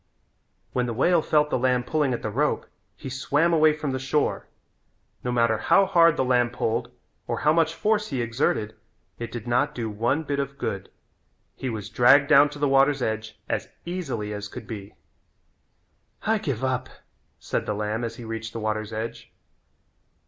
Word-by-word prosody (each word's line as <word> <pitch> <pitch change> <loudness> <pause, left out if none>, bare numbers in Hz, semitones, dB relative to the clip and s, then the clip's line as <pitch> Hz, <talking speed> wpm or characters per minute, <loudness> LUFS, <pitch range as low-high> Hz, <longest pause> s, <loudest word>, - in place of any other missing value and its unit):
When 125 -1 0
the 115 - -3
whale 170 +7 +3
felt 150 -1 +2
the - - +1
lamb 125 0 +2
pulling 150 -2 0
at 120 - -3
the - - -2
rope - - 0 0.3
he - - -9
swam 145 +5 +1
away 155 -1 +5
from 150 -2 -3
the 130 - -2
shore. 135 +3 0 0.8
No 125 - -1
matter 115 -2 +2
how 195 - +4
hard 170 -3 +5
the 130 - +1
lamb 125 -1 +3
pulled 115 0 -2 0.4
or - - -2
how 150 +1 +4
much 165 0 +2
force 210 +2 +1
he 135 - -3
exerted 115 -2 0 0.5
it 115 - -5
did 120 -3 -6
not 125 +5 +1
do 115 -3 -3
one 120 +9 0
bit 140 -2 -2
of 140 0 -3
good. 100 -7 -4 0.7
He 130 - -4
was 105 -3 -5
dragged 130 +5 +5
down 145 -1 +7
to 145 - -9
the 145 0 +1
water's 135 0 +3
edge 110 0 -3
as - - -2 0.2
easily 135 - -3
as 105 0 -5
could - - -9
be. 105 -4 -8 1.3
"I 220 0 +2
give 135 - -3
up," 130 -1 -1 0.5
said - - -3
the 105 - -1
lamb 105 +2 -2
as 115 -1 -4
he 115 - -9
reached 115 0 -5
the 115 - -4
water's 110 0 -2
edge. 110 +1 -6
125 Hz, 185 wpm, -25 LUFS, 115-150 Hz, 1.3 s, down